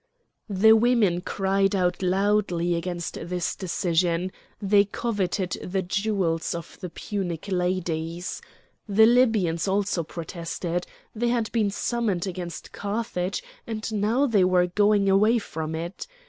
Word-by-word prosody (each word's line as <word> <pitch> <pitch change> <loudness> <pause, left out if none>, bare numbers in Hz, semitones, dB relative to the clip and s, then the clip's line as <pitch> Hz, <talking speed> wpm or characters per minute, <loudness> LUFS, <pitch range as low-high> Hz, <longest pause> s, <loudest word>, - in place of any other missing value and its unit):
The 205 +2 +5
women 220 -6 +3
cried 195 +1 +1
out 180 -1 +1
loudly 185 -2 +1
against 170 0 -3
this 175 +1 -2
decision; 175 -1 0 0.3
they 200 0 +4
coveted 200 -4 -2
the 190 +1 -2
jewels 185 -4 -1
of 170 - -8
the 180 - -5
Punic 180 -1 -4
ladies. 180 -2 -2 0.5
The 215 +2 +6
Libyans 220 -9 +3
also 195 -2 +1
protested. 170 +1 -4 0.3
They 235 +2 0
had 235 -2 0
been 220 -3 +1
summoned 205 -3 -1
against 180 -2 -6
Carthage, 200 -3 -3 0.2
and 220 -1 -4
now 220 +7 +2
they 215 -8 +3
were 180 -1 +4
going 205 +2 +3
away 210 +5 +4
from 160 -7 -4
it! 170 - -5
190 Hz, 125 wpm, -25 LUFS, 175-210 Hz, 0.5 s, The